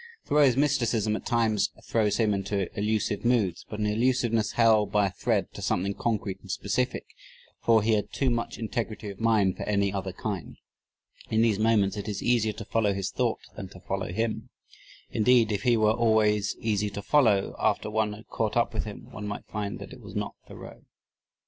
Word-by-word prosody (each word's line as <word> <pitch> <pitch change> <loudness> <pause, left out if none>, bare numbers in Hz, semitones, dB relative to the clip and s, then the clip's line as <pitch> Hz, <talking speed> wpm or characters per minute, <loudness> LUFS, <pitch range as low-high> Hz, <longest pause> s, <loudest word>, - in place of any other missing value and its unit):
Thoreau's 140 -4 +4
mysticism 120 -7 +1
at - - -6
times 115 -4 +2
throws 105 -3 +1
him 110 -3 +2
into 100 -1 -2
elusive 105 -1 -1
moods 110 -8 +1
but 105 - -5
an 105 - 0
elusiveness 115 -1 +1
held 110 -3 +4
by 105 -1 +3
a 95 - -1
thread - - -1
to - - -8
something 100 +3 0
concrete 100 -4 -2
and 95 - -15
specific, 100 +6 -1 0.6
for 115 -2 +4
he 110 - +2
had 105 -1 0
too 135 -2 0
much 115 -1 -2
integrity 110 -2 -4
of 100 - -12
mind 110 -5 +2
for - - -4
any 100 -1 +1
other 95 -1 -3
kind. 95 -1 -5 0.7
In 110 0 +3
these 110 -3 +2
moments 110 -3 +2
it 100 +1 -5
is 105 - -4
easier 115 -3 +2
to 110 - -8
follow 105 -2 +1
his 95 -1 -3
thought - - -1
than - - -6
to - - -13
follow - - -3
him. 110 +4 -2 0.6
Indeed, 115 0 +4
if 100 - -1
he 120 -3 +3
were 110 -1 +4
always 110 -3 +2
easy 105 -3 0
to 100 0 -7
follow, 110 -10 +3
after 105 - 0
one 110 -1 0
had 110 +3 -12
caught 110 0 -1
up 120 - +1
with 110 - -2
him, 105 -2 -9
one 105 -1 -6
might 100 - -5
find 105 -2 -4
that - - -9
it - - -12
was - - -11
not - - -3
Thoreau. - - -11
110 Hz, 195 wpm, -27 LUFS, 100-115 Hz, 0.7 s, Thoreau's